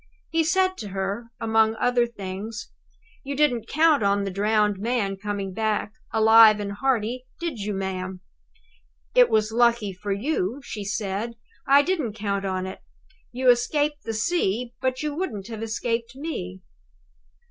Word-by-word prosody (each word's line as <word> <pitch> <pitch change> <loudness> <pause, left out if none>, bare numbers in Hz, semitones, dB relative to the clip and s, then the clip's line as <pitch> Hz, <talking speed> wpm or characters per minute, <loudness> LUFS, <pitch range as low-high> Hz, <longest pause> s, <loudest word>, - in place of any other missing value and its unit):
He 325 0 +2
said 375 +3 +2
to 210 - -6
her, 195 +4 -4
among 220 0 +2
other 245 +2 +2
things: 205 0 -7 0.5
"You 280 0 -4
didn't 250 -6 +2
count 310 -2 +4
on 200 0 +2
the 195 - -3
drowned 210 0 +1
man 215 -3 -1
coming 200 -1 -4
back, 215 0 -1 0.2
alive 220 -1 +7
and 200 -1 -3
hearty, 250 +2 -1
did 335 -9 -4
you, 205 0 -3
ma'am?" 190 -1 -4 0.9
"It's 220 - +4
lucky 235 -3 +2
for 200 +3 -5
you," 225 +1 -1
she 210 -5 -6
said, 210 +2 -3 0.3
"I 280 +1 +6
didn't 310 - -1
count 200 -2 -2
on 185 -1 -2
it. 190 - -7 0.5
You 255 +1 -4
have - - +10
escaped 290 +5 -1
the 225 - -4
sea, 235 - 0
but 260 +1 -1
you 300 -1 -2
wouldn't 255 - -4
have 225 -2 -6
escaped 230 +2 -2
me." 265 - -5
220 Hz, 150 wpm, -25 LUFS, 200-255 Hz, 0.9 s, have